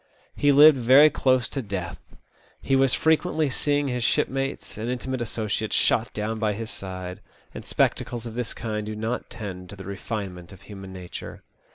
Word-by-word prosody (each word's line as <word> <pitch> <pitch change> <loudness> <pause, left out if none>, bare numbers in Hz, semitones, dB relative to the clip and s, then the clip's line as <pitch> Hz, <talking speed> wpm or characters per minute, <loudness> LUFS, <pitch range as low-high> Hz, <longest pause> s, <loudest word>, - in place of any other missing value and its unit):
He 145 0 +3
lived 145 0 +8
very 135 +6 +7
close 130 -2 +2
to 135 - -3
death. 95 -6 -5 0.6
He 135 - +1
was 135 -1 +3
frequently 160 0 +2
seeing 145 +1 0
his 125 -2 -2
shipmates 135 +4 -1
and 110 +3 -4
intimate 125 0 -3
associates 110 -1 -2
shot 115 0 +2
down 110 +1 -3
by 110 -2 +1
his 115 +2 -6
side, 95 -1 -7 0.3
and - - -7
spectacles 120 -1 0
of 115 - -6
this 120 0 -3
kind 110 -2 -3
do 110 - -4
not 110 +3 -3
tend 90 -5 -7
to 100 - -8
the 95 -1 -10
refinement 95 -3 -5
of 95 - -14
human 95 -2 -10
nature. 90 -2 -8
115 Hz, 175 wpm, -25 LUFS, 100-130 Hz, 0.6 s, lived